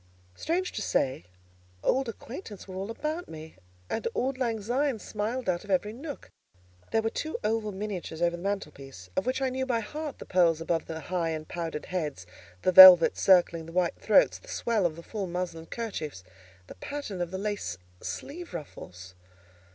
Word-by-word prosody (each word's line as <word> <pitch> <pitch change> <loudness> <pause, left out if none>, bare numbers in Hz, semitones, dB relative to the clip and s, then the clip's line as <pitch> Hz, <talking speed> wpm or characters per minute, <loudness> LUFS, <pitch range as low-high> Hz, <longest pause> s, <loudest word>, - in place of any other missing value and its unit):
Strange 350 - -1
to 215 - -4
say, 130 - 0 0.6
old 265 -2 +2
acquaintance 230 - -9
were 190 - -8
all 195 +3 -4
about 305 +9 -4
me, 160 -4 -10 0.3
and 225 - -2
"auld 260 +1 -1
lang 230 -4 0
syne" 250 +5 0
smiled 220 +4 -3
out 175 -1 0
of 205 - -14
every 200 +3 +1
nook. 285 +4 -8 0.6
There 225 - +1
were 225 - 0
two 315 - -3
oval 215 0 0
miniatures 190 -5 -5
over 170 0 +2
the 170 - -9
mantel 195 -5 -2
piece, 135 -11 -12
of - - -1
which 260 +1 0
I 265 - +2
knew 260 0 -2
by 235 -3 +1
heart 300 +6 -6
the - - -9
pearls 170 -3 +3
about 165 0 -1
the 160 -1 -5
high 175 0 -1
and 155 -1 -4
powdered 165 -3 -4
"heads;" 150 - -3 0.4
the - - +3
velvets 185 -2 +10
circling 175 -3 +4
the 165 - -10
white 180 -1 0
throats; - - +4
the - - -19
swell 225 - +1
of 155 - -7
the 170 - -10
full 205 -1 -4
muslin 170 -2 -4
kerchiefs: 160 - -5 0.4
the - - -10
pattern 280 -11 -5
of 175 - -2
the 190 - -4
lace 200 - -3 0.2
sleeve 335 - -6
ruffles. 95 - -9
190 Hz, 185 wpm, -28 LUFS, 165-235 Hz, 0.6 s, velvets